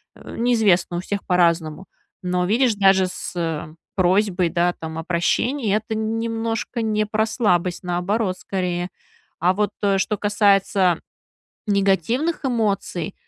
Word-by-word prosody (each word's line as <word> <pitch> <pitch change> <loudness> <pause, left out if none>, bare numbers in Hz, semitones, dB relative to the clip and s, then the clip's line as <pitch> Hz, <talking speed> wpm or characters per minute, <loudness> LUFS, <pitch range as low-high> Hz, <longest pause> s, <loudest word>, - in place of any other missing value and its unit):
Э, - - -11
неизвестно, 215 -8 +2
у - - -1
всех 200 +2 -4
по-разному. 170 -1 +1 0.4
Но, 180 0 0
видишь, 230 +4 +2
даже 195 -2 +4
с 165 -4 -4 0.2
просьбой, 185 -1 +2
да, 175 +1 +1
там 160 0 -6
о - - -5
прощении- 205 - 0
это 220 +1 -2
немножко 225 +1 -2
не 215 -1 0
про 220 +1 +1
слабость, 185 -6 0
наоборот, 185 +2 -1
скорее. 180 -2 -3 0.5
А 180 +3 +3
вот 210 +1 0 0.3
что 210 +2 0
касается 200 -3 +2 0.7
негативных 205 - +1
эмоций, 205 - -1
195 Hz, 120 wpm, -22 LUFS, 175-220 Hz, 0.7 s, даже